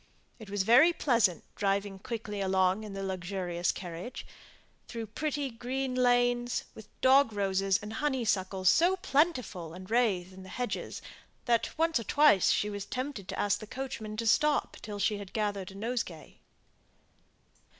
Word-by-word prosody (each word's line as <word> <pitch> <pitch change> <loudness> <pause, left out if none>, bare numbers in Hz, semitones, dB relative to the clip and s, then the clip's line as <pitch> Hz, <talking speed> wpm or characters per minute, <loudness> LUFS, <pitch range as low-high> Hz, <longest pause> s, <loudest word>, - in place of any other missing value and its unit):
It 220 -3 -11
was 200 -1 0
very 250 - +7
pleasant 230 - +2
driving 195 0 -1
quickly 215 -3 -5
along 190 +1 +2
in 210 -2 -7
the 195 0 -4
luxurious 180 -2 -2
carriage, 180 +7 -7 0.6
through 230 -1 -5
the 215 - -21
pretty 290 0 -2
green 255 +3 -3
lanes, 245 -1 +2
with 220 -1 -12
dog 265 -2 +5
roses 195 -1 +1
and 210 +1 -6
honeysuckles 210 -8 0
so 345 - +5
plentiful 255 - 0
and 185 +1 -10
rathe 195 -7 +1
in 190 - -11
the 190 - -11
hedges, 245 +5 -4 0.4
that 235 -2 +2
she - - -11
once 325 -3 +2
or - - -5
twice 255 -4 +4
was 205 -1 -5
tempted 255 -7 -4
to - - -5
ask 205 -1 +1
the 215 - -9
coachman 220 -4 -6
to 230 - -2
stop 295 +6 +2
till 210 -1 -6
she 205 +1 0
had 200 -2 -10
gathered 205 -4 -2
a 195 - -12
nosegay. 215 -6 -4
215 Hz, 160 wpm, -30 LUFS, 195-250 Hz, 0.6 s, very